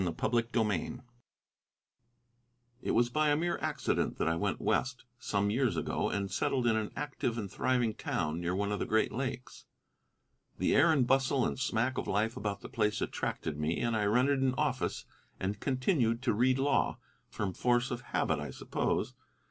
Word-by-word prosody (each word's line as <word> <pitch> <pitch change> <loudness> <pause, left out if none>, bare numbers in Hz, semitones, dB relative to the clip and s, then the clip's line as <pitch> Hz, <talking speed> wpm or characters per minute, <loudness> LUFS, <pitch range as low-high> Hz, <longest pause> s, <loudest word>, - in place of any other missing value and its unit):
CHAPTER 105 +7 +1 0.2
II 105 +3 -1 1.8
It - - -4
was 120 +1 +3
by 155 +3 +2
a 145 - +3
mere 170 +2 -1
accident - - -1
that - - 0
I 80 - +2
went 85 - -1
West, 125 -2 0
some 100 -2 0
years 125 +1 +1
ago, - - -1
and 100 -1 -2
settled 125 -2 0
in 115 -2 +3
an 110 -1 -1
active 130 -5 -2
and 100 -4 -4
thriving 125 -4 +1
town 75 -4 -2
near 90 +1 -1
one 100 +1 -1
of 105 - -1
the - - -2
Great 110 +1 +2
Lakes. 125 +1 -5 0.9
The - - +2
air 165 - +6
and 140 -5 +3
bustle 135 0 +2
and - - -2
smack 130 0 0
of - - -4
life 110 +3 0
about 100 -1 -3
the - - -7
place 110 -4 0
attracted 75 -2 -3
me, 75 +2 0
and 115 -1 0
I 105 -2 +1
rented 130 +6 +3
an 130 -1 +2
office 140 -4 -1 0.3
and 100 +2 -2
continued 130 -3 +1
to 130 - +2
read 125 +4 +3
law, 140 +2 +1 0.3
from 100 -3 -3
force 120 +4 +1
of 125 0 -3
habit, 120 - 0
I - - -5
suppose. - - -2
120 Hz, 180 wpm, -31 LUFS, 105-130 Hz, 1.8 s, air